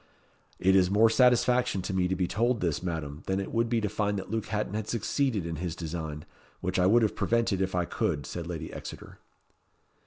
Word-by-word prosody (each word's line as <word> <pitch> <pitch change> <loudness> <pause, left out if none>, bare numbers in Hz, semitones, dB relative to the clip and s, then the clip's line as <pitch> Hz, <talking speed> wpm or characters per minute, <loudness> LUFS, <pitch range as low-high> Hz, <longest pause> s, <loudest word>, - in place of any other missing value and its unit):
"It 95 +1 +3
is 90 -2 +5
more 110 +3 +5
satisfaction 125 -4 +3
to 95 - -3
me 90 -1 +2
to 95 - 0
be 90 0 0
told 120 +4 +1
this, 85 -6 -1
Madam, 80 -4 -4
than 95 0 0
it 100 - -4
would 115 0 +1
be 115 -1 +2
to 105 - 0
find 105 0 -1
that 95 +1 -6
Luke 110 -1 -2
Hatton 105 -2 -2
had 110 0 -3
succeeded 115 - 0
in 85 -2 -4
his 85 0 -3
design, 80 -3 -5 0.3
which 95 +1 -1
I 90 - +4
would 115 +4 +5
have 110 - +1
prevented 115 -5 +1
if 95 -1 -1
I 90 -1 +1
could," 70 -4 -1
said 85 -1 -5
Lady 85 -3 -5
Exeter. - - -9
95 Hz, 215 wpm, -28 LUFS, 85-115 Hz, 0.3 s, is